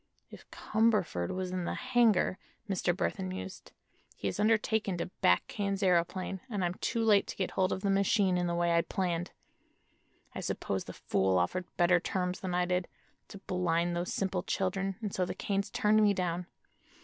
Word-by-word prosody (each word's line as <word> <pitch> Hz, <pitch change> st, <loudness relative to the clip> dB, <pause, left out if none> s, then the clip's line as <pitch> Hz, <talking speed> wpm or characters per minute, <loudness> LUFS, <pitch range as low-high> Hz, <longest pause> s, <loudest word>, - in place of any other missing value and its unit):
"If -, -, -13 dB
Cumberford 210 Hz, -, +1 dB
was 185 Hz, -1 st, -3 dB
in 185 Hz, -1 st, -2 dB
the -, -, -2 dB
hangar," 235 Hz, -7 st, +2 dB, 0.3 s
Mr. 190 Hz, -3 st, +1 dB
Burthon 185 Hz, +1 st, -2 dB
mused, 185 Hz, 0 st, -7 dB, 0.4 s
"he -, -, -4 dB
has -, -, -3 dB
undertaken 215 Hz, -2 st, +2 dB
to 175 Hz, -, -4 dB
back 90 Hz, +1 st, +4 dB
Kane's 200 Hz, -1 st, -2 dB
aëroplane, 185 Hz, +1 st, +1 dB
and 200 Hz, -5 st, -1 dB
I'm 175 Hz, -, -1 dB
too 230 Hz, -, 0 dB
late 210 Hz, -3 st, +4 dB
to -, -, -6 dB
get 190 Hz, -, -2 dB
hold 185 Hz, 0 st, +1 dB
of 190 Hz, -, -2 dB
the 200 Hz, -, +1 dB
machine 195 Hz, -1 st, +3 dB
in 175 Hz, 0 st, 0 dB
the 170 Hz, -, -1 dB
way 170 Hz, 0 st, +2 dB
I 170 Hz, -, +5 dB
planned. 175 Hz, -1 st, -2 dB, 1.0 s
I -, -, -5 dB
suppose -, -, -3 dB
the -, -, -8 dB
fool 95 Hz, -1 st, +1 dB
offered 175 Hz, -, 0 dB
better 175 Hz, 0 st, +5 dB
terms 180 Hz, 0 st, -2 dB
than 185 Hz, -2 st, -3 dB
I 180 Hz, 0 st, +2 dB
did, 180 Hz, 0 st, 0 dB, 0.4 s
to -, -, -10 dB
blind 175 Hz, -2 st, 0 dB
those 175 Hz, +1 st, -2 dB
simple 190 Hz, -2 st, -1 dB
children, 195 Hz, +1 st, -1 dB
and 205 Hz, -, -3 dB
so 185 Hz, -, 0 dB
the 180 Hz, -, -3 dB
Kanes 200 Hz, -1 st, -1 dB
turned 215 Hz, +1 st, +3 dB
me 205 Hz, -1 st, +4 dB
down. 180 Hz, -1 st, -2 dB
185 Hz, 185 wpm, -31 LUFS, 175-200 Hz, 1.0 s, I